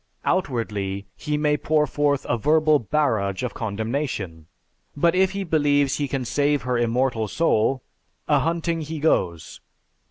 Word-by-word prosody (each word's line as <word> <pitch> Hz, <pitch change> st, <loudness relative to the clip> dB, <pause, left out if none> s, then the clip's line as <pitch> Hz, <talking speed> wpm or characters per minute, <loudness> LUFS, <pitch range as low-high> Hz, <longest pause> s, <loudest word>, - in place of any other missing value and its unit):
Outwardly, 105 Hz, -, -1 dB
he 150 Hz, +10 st, -2 dB
may 150 Hz, 0 st, +2 dB
pour 150 Hz, 0 st, +2 dB
forth 145 Hz, 0 st, 0 dB
a -, -, +1 dB
verbal 155 Hz, +5 st, +3 dB
barrage 110 Hz, -6 st, 0 dB
of 125 Hz, -, -3 dB
condemnation, 110 Hz, -, -4 dB, 0.5 s
but 170 Hz, +3 st, +3 dB
if 190 Hz, +1 st, +2 dB
he 200 Hz, 0 st, -2 dB
believes 145 Hz, -5 st, +2 dB
he 145 Hz, -, -1 dB
can 135 Hz, -1 st, -3 dB
save 145 Hz, +1 st, +1 dB
her 125 Hz, 0 st, -1 dB
immortal 120 Hz, -1 st, 0 dB
soul, 130 Hz, -1 st, +1 dB, 0.4 s
ahunting 165 Hz, 0 st, +1 dB
he 155 Hz, +1 st, -5 dB
goes. 90 Hz, -, 0 dB
140 Hz, 135 wpm, -23 LUFS, 110-155 Hz, 0.5 s, verbal